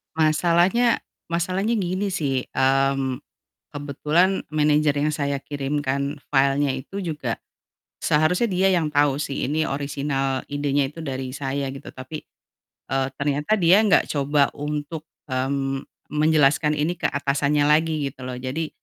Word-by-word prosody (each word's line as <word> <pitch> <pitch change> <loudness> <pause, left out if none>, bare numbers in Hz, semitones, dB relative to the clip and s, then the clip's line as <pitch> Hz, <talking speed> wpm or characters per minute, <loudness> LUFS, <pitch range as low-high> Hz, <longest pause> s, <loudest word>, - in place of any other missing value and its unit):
Masalahnya, 175 +9 +3 0.3
masalahnya 185 +5 0
gini 185 +2 -1
sih, 140 -8 -1
mmm, 135 0 +1 0.5
kebetulan 150 +6 +1
manager 150 -1 +2
yang 150 +2 +1
saya 140 -2 -1
kirimkan 140 0 -2 0.2
filenya 140 +1 +3
itu 160 +10 -5
juga 150 -9 -3 0.6
seharusnya 180 +9 +2
dia 190 +1 +3
yang 155 -3 0
tau 145 -2 +3
sih 140 -2 -2
ini 155 +2 +1
orisinal 140 -1 -2
idenya 145 -1 0
itu 165 - -9
dari 130 -4 -4
saya 135 0 -3
gitu 135 +1 -9
tapi, 130 +4 -8 0.7
eee, 135 0 +1
ternyata, 145 +8 0
dia 185 +2 +5
nggak 215 -2 +4
coba 140 0 +2
untuk, 150 +2 -5 0.2
mmm, 135 +1 -1 0.2
menjelaskan 150 0 +3
ini 150 +4 0
ke - - -7
atasannya 140 +1 +1
lagi 160 +2 +3 0.2
gitu 135 - -19
loh. 125 - -4
Jadi 150 +5 -3
145 Hz, 130 wpm, -23 LUFS, 135-160 Hz, 0.7 s, dia